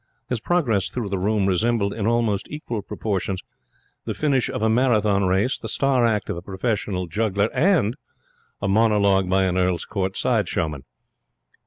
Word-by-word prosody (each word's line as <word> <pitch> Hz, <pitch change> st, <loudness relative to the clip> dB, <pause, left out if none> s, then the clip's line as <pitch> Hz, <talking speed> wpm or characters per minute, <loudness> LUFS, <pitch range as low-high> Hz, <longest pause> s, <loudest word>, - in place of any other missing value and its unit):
His 125 Hz, -, -1 dB
progress 115 Hz, -, +1 dB
through 115 Hz, -5 st, -4 dB
the 95 Hz, -1 st, -2 dB
room 105 Hz, +1 st, +1 dB
resembled 100 Hz, +2 st, +1 dB
in 110 Hz, -2 st, -2 dB
almost 115 Hz, -4 st, +1 dB
equal 120 Hz, -8 st, -5 dB
proportions 95 Hz, -2 st, -3 dB, 0.7 s
the -, -, -3 dB
finish 140 Hz, -4 st, +1 dB
of -, -, -3 dB
a -, -, +3 dB
Marathon 110 Hz, -4 st, +2 dB
race, 95 Hz, +7 st, +1 dB
the -, -, -6 dB
star 130 Hz, -4 st, +2 dB
act 105 Hz, -2 st, 0 dB
of -, -, -3 dB
a -, -, -6 dB
professional 100 Hz, -1 st, -2 dB
juggler, 100 Hz, +3 st, 0 dB
and 160 Hz, -, +2 dB, 0.7 s
a -, -, +1 dB
monologue 100 Hz, -2 st, +3 dB
by 95 Hz, +1 st, +3 dB
an 95 Hz, -1 st, +1 dB
Earl's 90 Hz, -1 st, 0 dB
Court 95 Hz, -2 st, -2 dB
side 110 Hz, -8 st, +1 dB
showman. 75 Hz, -4 st, -2 dB
105 Hz, 165 wpm, -23 LUFS, 95-115 Hz, 0.7 s, a